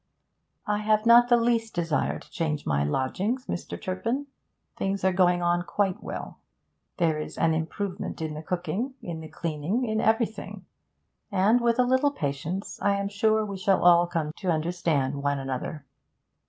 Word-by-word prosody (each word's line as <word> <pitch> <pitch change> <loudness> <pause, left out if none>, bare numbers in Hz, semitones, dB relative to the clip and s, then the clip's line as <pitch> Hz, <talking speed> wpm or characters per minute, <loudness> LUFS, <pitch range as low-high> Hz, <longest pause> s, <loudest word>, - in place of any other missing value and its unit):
'I 210 0 0
have 215 +1 +2
not 240 +1 +7
the 240 - +6
least 230 -1 +1
desire 165 -3 0
to - - -16
change 155 -3 -2
my 70 -1 +1
lodgings, 185 - -1
Mr. 175 - -5
Turpin. 230 +10 -2 0.5
Things 195 0 -2
are 190 0 +3
going 180 -1 +3
on 175 0 +2
quite 190 +1 -1
well. - - -7 0.6
There 160 -3 +1
is 155 - -6
an 160 - +3
improvement 180 +5 -3
in 160 -1 -3
the 155 - -6
cooking, 180 - -3
in 170 -2 -5
the 160 - -8
cleaning, 165 - -2
in 220 -1 0
everything; 225 0 -1 0.7
and, 205 +5 +3
with 235 0 +2
a 250 - +5
little 260 +3 +3
patience, 155 - -4
I 200 0 +3
am 200 0 -2
sure 215 +1 +2
we 200 -2 -5
shall 190 0 +2
all 175 0 +6
come 160 -3 -2
to 190 - -3
understand 155 -4 0
one 140 0 0
another. 135 +2 -4
185 Hz, 165 wpm, -27 LUFS, 160-220 Hz, 0.7 s, not